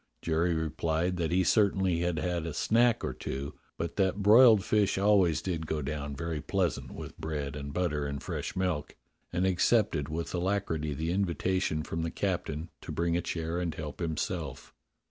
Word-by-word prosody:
Jerry 85 +1 +1
replied 80 +3 -1
that 85 -2 0
he 95 +1 +3
certainly 95 -2 +3
had 85 -1 0
had 85 -1 -1
a 75 - -5
snack 115 +7 +3
or - - -2
two, 70 +1 -5 0.2
but 85 0 -4
that 100 0 +1
broiled 110 -1 +7
fish 105 -3 +2
always 95 -5 +3
did 85 -4 -3
go 75 -1 -2
down 70 0 -4
very 80 +1 -3
pleasant 90 +2 -1
with - - -8
bread 75 -3 -3
and 70 -1 -5
butter 75 -3 -1
and 70 0 -4
fresh - - -4
milk, 90 -5 -1 0.4
and 90 +2 +1
accepted 95 -4 +2
with 80 +2 -4
alacrity 85 -5 -1
the 80 +3 -2
invitation 90 -3 0
from 80 +1 -3
the 80 - -1
captain 85 -4 -2
to - - -7
bring 85 0 0
a 85 - +1
chair 85 0 -3
and 85 -3 -2
help 75 -2 -6
himself. 80 -3 -3
85 Hz, 175 wpm, -30 LUFS, 80-95 Hz, 0.4 s, broiled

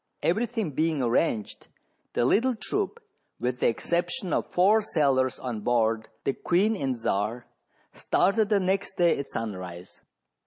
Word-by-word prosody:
Every 215 +8 +2
thing 220 -8 -3
being 155 0 0
arranged, 115 -2 0 0.5
the 120 - +1
little 245 - +3
troop, 410 - -3 0.4
with 125 +1 -2
the - - +3
exception 175 - -1
of - - -1
four 205 +5 +4
sailors 135 -9 +1
on 120 -4 -4
board 115 0 +1
the 135 - 0
"Queen 200 +10 +1
and 135 - -2
Czar," 115 +2 -1 0.5
started 200 +3 +1
the 210 -2 +3
next 190 +1 -1
day 175 -1 +4
at 140 - -4
sunrise. 90 -5 -6
155 Hz, 145 wpm, -27 LUFS, 120-200 Hz, 0.5 s, four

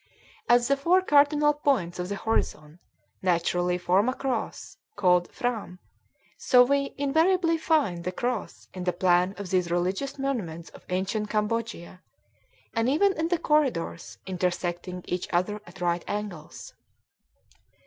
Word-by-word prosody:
As 240 0 +5
the 275 - +3
four 345 +7 +3
cardinal 295 -1 +4
points 260 -13 0
of 180 +1 -3
the 200 - -2
horizon 165 -7 -2 0.4
naturally 180 0 +1
form 185 +6 +2
a 255 - -2
cross, 250 -3 -4 0.2
called 180 -3 +2
"phram," 225 -7 -3 0.6
so 250 -1 +6
we 280 +2 0
invariably 330 +5 +2
find 280 - +1
the 180 - -2
cross 240 +3 -4
in 185 - -6
the 180 - +1
plan 180 +1 +2
of 200 -3 -7
these 180 -2 +1
religious 185 +11 -1
monuments 205 - -3
of - - -15
ancient 195 +4 -2
Cambodia, 210 -4 -3 0.7
and 230 +1 +1
even 385 +8 +3
in 325 -2 -1
the 350 0 +1
corridors, 285 - 0
intersecting 180 -1 -3
each 180 0 -3
other 195 +4 0
at 180 +1 -13
right 175 0 0
angles. 205 -7 -6
205 Hz, 140 wpm, -26 LUFS, 180-275 Hz, 0.7 s, so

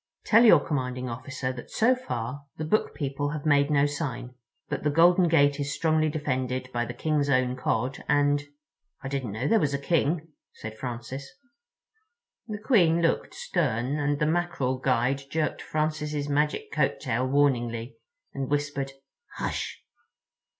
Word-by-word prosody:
Tell 225 +2 +6
your 175 -8 +8
commanding 125 -3 -2
officer 130 +2 -4
that 120 - -9
so 240 +4 +3
far 140 - -5
the 155 - -3
Book 215 +8 +1
People 145 0 -2
have 150 -1 -5
made 145 -1 +4
no 145 -1 +4
sign, 130 -4 -4 0.3
but - - -3
the 150 - +1
golden 175 +4 +5
gate 145 -3 +3
is 145 0 -2
strongly 155 -1 +2
defended 130 -4 -2
by 120 0 0
the - - -6
King's 150 -2 0
Own 130 -2 +2
Cod, 130 +1 -2
and—" 145 0 +3 0.6
"I - - -4
didn't 135 -5 -3
know 110 +7 -2
there 225 - +4
was 140 -5 0
a - - 0
King," 160 +2 0 0.2
said 110 0 -8
Francis. 125 +3 -6 1.2
The 215 -2 -4
Queen 190 -8 +3
looked 165 - 0
stern, 140 - -1
and 145 0 +1
the 150 - +1
Mackerel 155 -6 0
guide 130 +1 +1
jerked 155 0 -1
Francis's 150 -1 -2
magic 150 +1 0
coattail 125 +3 0
warningly 120 -4 +1 0.4
and 135 -1 -3
whispered 145 -1 -1 0.4
"Hush!" - - -4
145 Hz, 150 wpm, -27 LUFS, 130-155 Hz, 1.2 s, your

